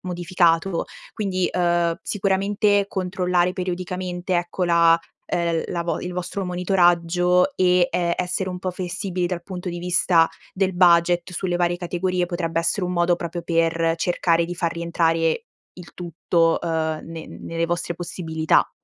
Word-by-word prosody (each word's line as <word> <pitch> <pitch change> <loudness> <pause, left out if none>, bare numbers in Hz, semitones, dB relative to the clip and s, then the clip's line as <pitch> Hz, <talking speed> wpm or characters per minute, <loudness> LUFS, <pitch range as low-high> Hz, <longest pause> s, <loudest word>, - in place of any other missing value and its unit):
modificato. 175 -1 +1 0.3
Quindi, 185 -4 -1
uhm, 175 -1 +1
sicuramente, 200 0 +1
controllare 180 -2 0
periodicamente, 180 0 -3
ecco, 175 +1 -2
la 170 -1 +5 0.3
uhm, 170 -1 +1
la 170 -1 -2
vo 170 -2 -2
il 180 - -5
vostro 180 +2 -4
monitoraggio 180 +3 +2
e, 180 -1 +3
ehm, 170 -1 0
essere 180 +1 -2
un 180 - -5
po' 185 -1 -3
flessibili 180 0 -3
dal 175 -1 -4
punto 185 -1 -6
di 175 0 -4
vista 175 -1 +3 0.2
del 190 -1 0
budget 175 0 +4
sulle 180 0 -2
varie 175 0 +1
categorie 180 0 -1
potrebbe 170 -2 -2
essere 170 +3 0
un 180 - -2
modo 175 0 +3
proprio 170 0 -5
per 165 0 +1
cercare 170 -1 +1
di 175 0 -6
far 170 -1 -1
rientrare 165 - 0 0.3
il 180 -2 -13
tutto, 170 -1 +1
uhm, 160 -2 -1
ne 165 -1 -8
nelle 165 0 -4
vostre 175 0 -2
possibilità. 160 -2 0
175 Hz, 145 wpm, -23 LUFS, 170-180 Hz, 0.3 s, la